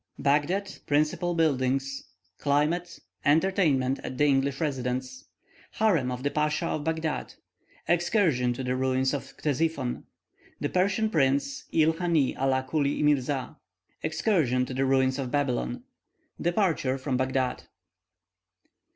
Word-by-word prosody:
BAGHDAD 175 +8 0
PRINCIPAL 155 +4 +1
BUILDINGS 135 -3 0 0.3
CLIMATE 150 +5 0 0.2
ENTERTAINMENT 150 -5 +2
AT 130 - -6
THE 145 - +2
ENGLISH 135 -1 +1
RESIDENT'S 130 - -3 0.5
HAREM 165 -13 +2
OF 125 +1 -5
THE 145 - 0
PASCHA 150 +3 0
OF 155 -2 -2
BAGHDAD 160 -1 -2 0.5
EXCURSION 170 - +2
TO 130 +2 -5
THE 125 0 -1
RUINS 130 +1 +1
OF 140 - -6
CTESIPHON 145 -3 -1 0.6
THE 145 - -1
PERSIAN 200 +4 +1
PRINCE, 140 - +1
IL 160 0 +3
HANY 165 -7 +1
ALA 130 0 +1
CULY 145 0 0
MIRZA 140 -3 +1 0.5
EXCURSION 155 - +1
TO 130 - -6
THE 135 +1 0
RUINS 130 0 +2
OF 130 -2 -3
BABYLON 125 - -1 0.6
DEPARTURR 170 -7 +1
FROM 130 -1 -2
BAGHDAD. 130 -1 -1
145 Hz, 120 wpm, -27 LUFS, 130-165 Hz, 0.6 s, IL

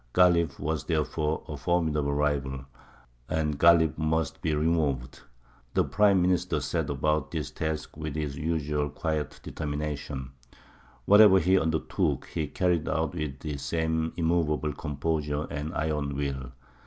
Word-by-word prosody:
Ghālib 85 -5 +4
was 75 -1 -2
therefore 80 -1 -1
a 75 - -5
formidable 75 -1 0
rival, 70 -2 -1 0.6
and 75 -2 -1
Ghālib 85 -2 +5
must 80 -1 -1
be 80 -1 0
removed. 75 -5 0 0.5
The - - +4
Prime 100 -3 +3
Minister 90 0 +1
set - - -2
about 75 +2 0
this 80 -4 -4
task 80 -1 -4
with 75 -2 -5
his 75 -3 -3
usual 75 -1 -1
quiet 75 +1 -3
determination. 75 -3 -4 0.7
Whatever 105 -1 +8
he 95 +2 +4
undertook 80 -1 0
he 80 -3 -3
carried 85 0 0
out 80 +1 0
with 75 -5 -4
the 75 -2 -4
same 80 +2 -1
immovable 80 -3 +1
composure 75 0 -2
and 75 +2 -4
iron 75 -2 -1
will. 70 -3 -3
75 Hz, 130 wpm, -28 LUFS, 75-80 Hz, 0.7 s, Whatever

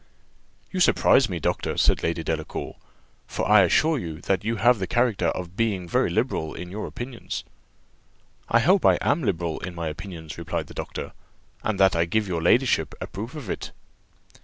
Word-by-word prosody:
"You 185 - -2
surprise 135 -8 +4
me, 90 -3 -3
doctor!" - - -1
said - - +3
Lady 85 0 -1
Delacour; 80 -1 -4 0.5
"for - - -2
I 105 -1 +7
assure 155 - +3
you 80 -6 -6
that 95 0 0
you 115 +2 -1
have 120 +1 +4
the 95 - -2
character 120 -7 +1
of 90 +1 -3
being 100 -6 0
very - - +2
liberal 80 -1 -1
in 90 0 -7
your 105 +2 -4
opinions." 120 -1 -6 1.1
"I 120 - +4
hope 185 +7 +4
I - - +5
am 145 +4 +2
liberal 85 - -1
in 90 -2 -6
my 85 -2 -3
opinions," 80 -1 -8
replied 85 -1 -3
the - - -13
doctor, - - -5 0.5
"and 110 -3 -2
that 95 -1 +5
I 85 0 +2
give 105 +4 0
your 85 -3 -2
ladyship 120 +10 +2
a - - -4
proof 115 +9 -7
of 145 -8 -7
it." - - -5
95 Hz, 185 wpm, -25 LUFS, 85-115 Hz, 1.1 s, I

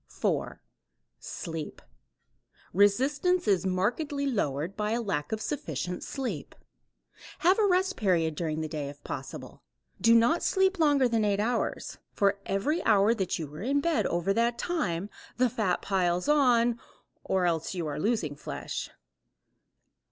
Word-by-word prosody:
4. - - -2 0.6
Sleep. 165 -4 -6 0.9
Resistance 265 - +2
is 195 -2 +2
markedly 250 - -1
lowered 180 - -1
by 210 0 -1
a 235 - 0
lack 170 -10 -2
of 220 - -1
sufficient 180 - -4
sleep. 270 -2 -5 0.9
Have 370 +4 +5
a 420 - +4
rest 380 +1 +1
period 170 -6 +2
during 155 0 -2
the 155 - -2
day 150 -2 -4
if 145 0 -13
possible. - - -7 0.4
Do 230 0 +6
not 235 +9 +4
sleep 380 -1 +2
longer 290 -5 +4
than 230 -2 +1
eight 205 -1 +1
hours. 230 +3 -2
For 200 0 +2
every 250 - 0
hour 210 -1 +4
you 180 -9 -2
are 150 - -8
in 275 +6 +1
bed 330 +2 +1
over 175 +3 0
that 235 +2 +1
time 200 - -2 0.3
the 250 -1 +2
fat 200 -6 0
piles 180 -2 0
on 245 -5 +3 0.4
or 190 -1 +1
else 165 +1 -1
you 175 -3 -2
are 150 -1 -3
losing 200 -8 0
flesh. - - -5
210 Hz, 145 wpm, -28 LUFS, 175-265 Hz, 0.9 s, Do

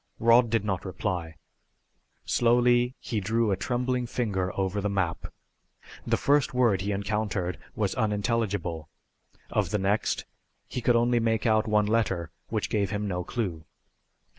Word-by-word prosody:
Rod 115 +1 +5
did 115 -2 +1
not 95 -3 -1
reply. 90 -4 -3 0.9
Slowly 120 +1 +3
he 115 -4 -3
drew 110 +2 +1
a - - +3
trembling 125 +3 -1
finger 100 -7 -1
over 95 +1 0
the 105 - -1
map. 95 -4 -2 0.8
The - - +2
first 140 -2 +2
word 115 -7 +3
he 100 +2 -2
encountered 100 -4 -2 0.2
was - - 0
unintelligible. 105 -7 -1 0.6
Of - - +1
the 105 - 0
next 100 +2 0 0.4
he 125 - -4
could 120 0 +3
only 120 +1 +3
make 115 0 0
out 110 -1 +3
one 105 -1 +3
letter, 100 -7 0 0.2
which - - -2
gave 100 -2 +1
him 105 0 -2
no 90 -2 -2
clue. 90 -8 -3
105 Hz, 145 wpm, -27 LUFS, 95-115 Hz, 0.9 s, Rod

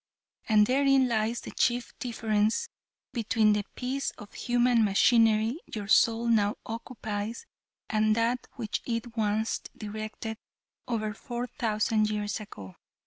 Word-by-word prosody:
And 210 -1 +6
therein 270 +1 +4
lies 230 0 0
the - - -8
chief 245 0 0
difference 225 - 0 0.4
between 220 -2 +3
the 210 0 0
piece 265 +2 -2
of 205 - -12
human 240 -1 +2
machinery 225 +4 +4 0.2
your 205 -2 -4
soul 230 +2 +4
now 210 -3 +3
occupies 225 - -5 0.4
and 215 -1 +2
that 230 +2 0
which 225 -4 -3
it 230 0 -3
once 220 0 0 0.2
directed 215 +1 -6 0.5
over 215 -3 -1
four 240 +2 -5
thousand 215 -3 0
years 210 0 -2
ago. 100 - -10
225 Hz, 125 wpm, -28 LUFS, 215-240 Hz, 0.5 s, And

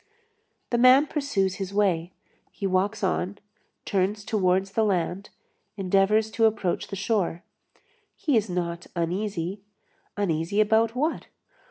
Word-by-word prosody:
The 240 - +2
man 255 +4 +7
pursues 235 - -1
his 195 0 -5
way, 180 -4 +1 0.4
he 200 - -6
walks 195 +3 0
on, 190 +1 -1 0.5
turns 200 +2 -1
towards 190 -2 +1
the 220 - +1
land, 190 -1 -1 0.5
endeavors 200 +3 +2
to 225 +1 +2
approach 205 -5 -1
the - - -6
shore. 190 -4 -1 0.7
He 295 -5 0
is 215 -2 +1
not 175 -1 -3
uneasy. 180 +2 -2 0.6
Uneasy 170 0 0
about 220 +2 +3
what? 305 +6 -1
195 Hz, 125 wpm, -26 LUFS, 180-220 Hz, 0.7 s, man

